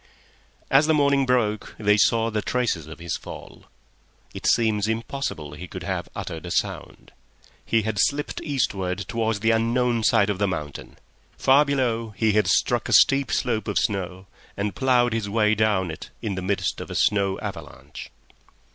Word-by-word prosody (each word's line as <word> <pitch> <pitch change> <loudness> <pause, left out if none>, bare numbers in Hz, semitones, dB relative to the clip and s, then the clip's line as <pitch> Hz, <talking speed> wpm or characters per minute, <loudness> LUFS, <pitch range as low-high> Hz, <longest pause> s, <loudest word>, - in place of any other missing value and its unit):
As 140 +3 +5
the 160 - +3
morning 140 -2 +3
broke 110 -4 0
they 105 -1 +3
saw 115 +2 +2
the 105 -1 -1
traces 110 -13 -1
of 80 - -9
his 85 -1 -4
fall. - - -11 0.7
It - - -4
seems 110 -3 +2
impossible 110 - -4
he 85 +5 -8
could - - -8
have - - -3
uttered 80 +1 -6
a - - -5
sound. - - -3 0.5
He 115 -1 +1
had 110 -2 -2
slipped 145 +6 0
eastward 95 - -1
towards 110 -2 -1
the 115 0 +3
unknown 115 +1 +1
side 105 -2 +3
of 100 - -4
the 100 - +2
mountain; 75 -6 -6 0.4
far 140 +3 +5
below 115 -6 -1
he 110 -1 +2
had 105 +1 +2
struck - - +1
a - - 0
steep 135 -1 +5
slope 115 -3 -1
of 105 - -1
snow, 95 -2 -2 0.3
and 100 -1 -2
ploughed 120 +1 +2
his 110 -3 -2
way 105 0 +2
down 105 -5 +1
it 80 - -9
in 105 - -2
the 95 - -4
midst 100 +2 -1
of - - -8
a - - -6
snow 100 -2 +2
avalanche. - - -8
110 Hz, 175 wpm, -24 LUFS, 100-120 Hz, 0.7 s, As